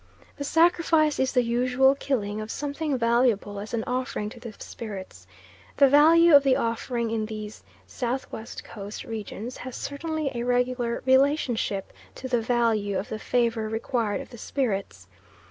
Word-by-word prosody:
The 285 - -4
sacrifice 325 -1 +3
is 265 0 +2
the 250 -2 +3
usual 250 +3 +3
killing 215 -7 -2
of 215 - -7
something 290 +1 -2
valuable 230 -4 +1
as 210 +2 -7
an 230 -2 -1
offering 250 -4 -2
to 235 - -12
the 235 -1 -8
spirits. 190 - -8 0.5
The 275 - +7
value 320 +4 +6
of 285 - +9
the 270 -2 +3
offering 230 0 -1
in 220 -1 -1
these 215 -1 -7 0.2
S.W. 245 -2 -4 0.2
Coast 205 -1 -8
regions 225 +2 -6
has 255 -1 -7
certainly 310 0 -3
a 235 - -3
regular 245 -1 0
relationship 260 -7 +2 0.2
to 260 - -6
the 245 -2 +1
value 225 -4 +1
of 200 - -4
the 215 - -4
favour 230 -2 0
required 225 -2 -1
of - - -12
the 240 - -11
spirits. 200 - -3
240 Hz, 155 wpm, -26 LUFS, 220-270 Hz, 0.5 s, of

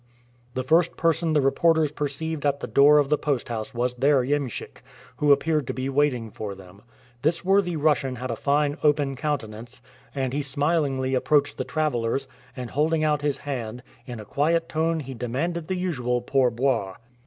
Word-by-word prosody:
The 130 - -1
first 165 +5 +2
person 165 -1 +1
the 150 - +4
reporters 160 +2 +3
perceived 150 +1 -3
at 140 -1 +1
the - - -4
door 145 +2 +6
of 145 -2 +3
the 150 - +2
post 140 -6 -1
house 110 -2 -4
was 120 +1 0
their 135 +1 +3
iemschik, 140 -2 -3 0.4
who 145 -1 +3
appeared 150 -1 +2
to - - -3
be 130 +1 -2
waiting 130 -5 +1
for 100 -2 -6
them. 95 +1 -15 0.4
This 165 +5 0
worthy 195 -2 +3
Russian 145 -4 +1
had 125 +1 -4
a - - -2
fine 145 +4 +1
open 145 -2 +2
countenance, 125 -4 -4 0.4
and 130 -2 -1
he 145 - 0
smilingly 140 -2 0
approached 145 +2 +2
the - - -1
travelers, 135 -4 -1 0.3
and, 125 -2 -6
holding 155 +2 +1
out 150 -1 +1
his 145 -2 0
hand, 125 -4 -5 0.2
in 120 -3 -6
a 105 - -9
quiet 165 +7 +1
tone 160 0 0
he 135 -1 -7
demanded 145 +8 -3
the 185 - -1
usual 125 -9 -1
"pour 130 +1 +2
boire." 115 -6 -1
140 Hz, 180 wpm, -25 LUFS, 125-155 Hz, 0.4 s, door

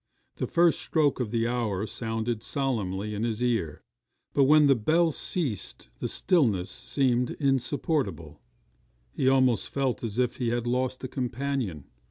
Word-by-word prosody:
The - - -2
first 170 -1 +3
stroke 150 -5 +1
of 120 -4 -1
the 115 +1 0
hour 110 -5 -1
sounded 115 +1 -3
solemnly 105 -7 -2
in 105 +1 -3
his 115 0 -1
ear, 110 -12 -1 0.5
but 140 - +4
when 150 +2 +6
the 140 - +6
bell 160 +8 +2
ceased 135 - -4
the - - -2
stillness 115 - +1
seemed 125 -3 0
insupportable 135 - -1 0.7
he 130 - +2
almost 130 -3 +3
felt 135 -3 -1
as 115 -1 -4
if 125 -1 +1
he 125 - -1
had 120 0 -1
lost 130 +1 -1
a - - -2
companion. 125 - -3
125 Hz, 150 wpm, -27 LUFS, 110-140 Hz, 0.7 s, when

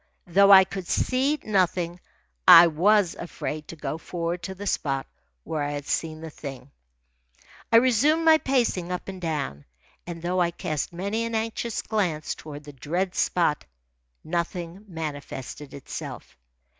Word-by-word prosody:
Though 195 +3 +5
I 190 -1 +10
could 190 -1 -7
see 270 +4 +1
nothing, 180 -4 0 0.5
I 170 - +11
was 180 +4 +3
afraid 155 -3 -6
to - - -8
go 150 0 -4
for'ard 170 0 -3
to 190 +3 -6
the 200 +2 -7
spot 135 -8 -1 0.4
where 155 - -3
I 145 0 -2
had 145 -1 -5
seen 155 0 -2
the 160 -1 -7
thing. 135 -2 -9 1.0
I - - +4
resumed 260 +7 +4
my 320 -1 +7
pacing 235 - 0
up 180 - -4
and 190 -1 -7
down, 145 - -3 0.4
and 170 -1 -6
though 180 +2 0
I 170 - +3
cast 155 -3 -3
many 200 +6 -2
an 230 0 -3
anxious 225 +1 -2
glance 175 -9 -1
toward 150 -1 -10
the 145 0 -11
dread 175 +8 -2
spot, 165 -4 +1 0.6
nothing 170 +3 -4
manifested 150 -4 -6
itself. 140 - -8
175 Hz, 150 wpm, -25 LUFS, 155-200 Hz, 1.0 s, I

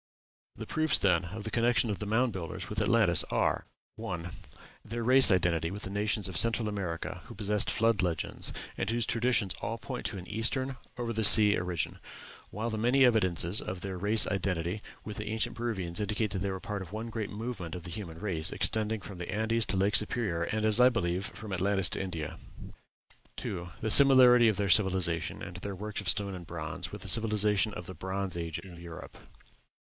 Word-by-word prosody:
The - - -7
proofs, 155 -1 +1
then, 90 -3 +2
of 100 +5 -7
the 110 - -6
connection 120 -1 +2
of 100 - -4
the 105 - -5
Mound 115 +2 +1
Builders 95 +2 -6
with 105 0 -2
Atlantis 105 -6 +4
are: - - -1 0.3
1. 90 -1 -5 0.5
Their 115 +1 -5
race 130 +3 +6
identity 85 -4 +1
with 100 +3 -7
the 95 - -5
nations 105 -1 -1
of 95 -3 -4
Central 115 -1 +3
America 90 -3 -4
who - - -10
possessed 105 -1 +1
Flood 115 -2 +2
legends, 85 -3 -2 0.3
and 95 - -1
whose 115 0 0
traditions 115 -5 +1
all 115 +2 -3
point 125 +1 -5
to 100 -1 -6
an 90 0 -9
eastern, 130 +5 -1 0.2
over 120 -1 -3
sea 105 0 +9
origin; 90 -3 -3 0.5
while 110 +3 -4
the 110 - -3
many 125 +4 +4
evidences 95 -5 +2
of 90 0 -6
their 95 -1 -5
race 105 +4 +2
identity 95 0 -2 0.2
with 105 -2 -7
the 105 - -5
ancient 110 +1 -2
Peruvians 100 -8 -3
indicate 105 0 -1
that 95 - -2
they 100 +1 -2
were 95 -1 -4
part 105 -1 -5
of 90 -2 -9
one 110 +2 -5
great 110 -3 -4
movement 105 -6 -6
of 90 - -7
the 90 - -8
human 85 -4 -7
race, 85 -6 -1
extending 110 -1 0
from 95 -1 -10
the 90 - -6
Andes 110 +1 -1
to 95 - -1
Lake 100 +2 +2
Superior, 105 -6 +1
and, 110 +3 -2
as 110 +1 +4
I 125 +1 +7
believe, 95 -5 -2
from 110 -3 -9
Atlantis 95 -1 0
to - - -3
India. 85 -5 -5 1.0
2. 90 -2 -5
The 110 - -1
similarity 125 -2 +8
of 110 -3 +1
their 100 -1 0
civilization, 90 -4 +1
and 90 - -8
their 100 +1 -6
works 105 +2 -5
of - - -2
stone 100 -2 0
and 90 -2 -9
bronze, 80 -3 -5
with - - -8
the - - -8
civilization 105 -2 +3
of 90 - -7
the 95 - -8
Bronze 95 +2 -4
Age 85 -2 -4
in 90 -3 -11
Europe. 85 -1 -10
100 Hz, 200 wpm, -30 LUFS, 90-110 Hz, 1.0 s, sea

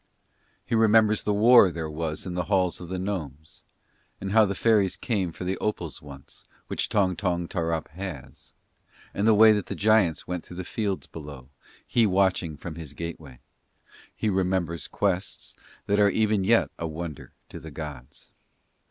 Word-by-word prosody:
He - - -5
remembers 110 -1 +4
the 105 - -1
war 115 -1 +7
there 85 -2 -5
was 75 0 -4
in 90 - -4
the 90 0 -2
halls 90 -1 0
of 85 - -8
the 95 - -3
gnomes; 80 -6 -5 0.6
and 95 0 -4
how 110 +1 +6
the 100 0 -3
fairies 105 -5 +2
came 100 -8 -1
for 85 - -8
the 95 +1 -2
opals 90 -7 -3
once, 70 -2 -13 0.2
which - - -3
Tong 95 -3 +2
Tong 90 -3 -1
Tarrup 85 -3 -2
has; 85 -5 -9 0.6
and 100 +2 0
the 110 - +6
way 110 +1 +8
that 105 -3 0
the - - -4
giants 105 -6 +2
went 90 -2 -4
through 90 - -11
the 95 - -4
fields 100 +1 -3
below, 70 -5 -10 0.4
he 115 -2 +2
watching 90 -5 +1
from 80 +2 -7
his 80 -3 -9
gateway: 80 -6 -8 0.7
he - - -2
remembers 90 -4 -1
quests 95 -1 -2 0.3
that 100 +1 +1
are 100 -1 +5
even 105 -1 +1
yet 115 +4 +3
a 85 - -2
wonder 80 -2 -7 0.2
to - - -9
the 80 - -10
gods. 75 -4 -9
90 Hz, 170 wpm, -26 LUFS, 80-105 Hz, 0.7 s, way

